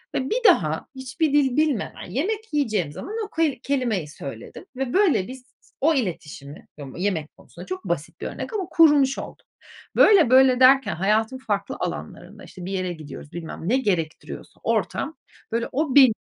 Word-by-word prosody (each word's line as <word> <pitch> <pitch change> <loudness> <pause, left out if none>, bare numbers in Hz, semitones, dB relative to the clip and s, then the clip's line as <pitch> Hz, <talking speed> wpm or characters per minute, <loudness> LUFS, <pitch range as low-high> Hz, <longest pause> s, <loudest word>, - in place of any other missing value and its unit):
ve 260 +1 -1
bir - - -1
daha 160 - +3
hiçbir 265 +3 -2
dil 275 -2 +3
bilmeden 290 - -1
yemek 415 - -3
yiyeceğim 215 - 0
zaman 415 - -7
o 405 - -12
ku 325 - -3 0.2
kelimeyi 240 - -1
söyledim 135 -5 -9
ve 260 -1 -3
böyle 370 - +3
biz 255 0 -10 0.4
o 320 +3 +4
iletişimi 155 - -5
ım 135 -2 -9
yemek 175 -5 -2
konusunda 175 +2 -13
çok 185 +1 -6
basit 170 -3 -4
bir - - -3
örnek - - -6
ama 390 -4 -2
kurmuş 290 -4 +5
olduk. - - -9 0.5
Böyle, 365 - +6
böyle 260 -1 +6
derken 265 -7 +5
hayatın 215 +7 +1
farklı 205 -5 -3
alanlarında, - - -6
işte, 180 -3 -10
bir 190 - -5
yere 185 -2 -2
gidiyoruz 150 -2 -10
bilmem 170 +1 -6
ne 255 - +3
gerektiriyorsa 180 -11 -3
ortam, 320 - -1 0.4
böyle 230 +1 -1
o 285 0 -1
benim 260 -5 +8
245 Hz, 165 wpm, -23 LUFS, 180-280 Hz, 0.5 s, benim